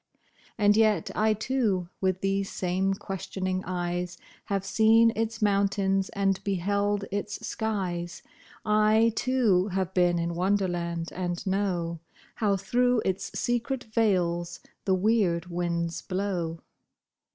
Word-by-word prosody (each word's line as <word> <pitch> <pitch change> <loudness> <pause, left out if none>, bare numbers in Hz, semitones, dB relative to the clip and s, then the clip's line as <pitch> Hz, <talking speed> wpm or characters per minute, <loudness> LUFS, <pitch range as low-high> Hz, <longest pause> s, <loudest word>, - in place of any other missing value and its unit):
And 205 -1 +4
yet 215 -6 +3
I, 215 0 +2
too, 215 -6 0
with 185 -1 0
these 195 0 0
same 190 +2 0
questioning 185 -1 -4
eyes, 175 -1 -3 0.3
Have 195 -1 -2
seen 225 +3 +5
its 225 0 -2
mountains 195 -1 +2
and 195 -1 0
beheld 200 +1 0
its 205 +1 -4
skies; 185 -6 -3 0.4
I, 215 +1 +4
too, 225 -9 +2
have 190 -1 -2
been 175 -1 +3
in 170 0 -1
Wonderland, 175 -2 -1
and 175 -1 -3
know 180 -4 -1 0.3
How 205 -3 +1
through 240 +4 +1
its 190 0 -2
secret 245 +2 -1
vales 175 -6 +1 0.3
the 190 - +3
weird 185 -4 +2
winds 170 -1 -2
blow. 180 -4 -3
195 Hz, 120 wpm, -27 LUFS, 180-210 Hz, 0.4 s, seen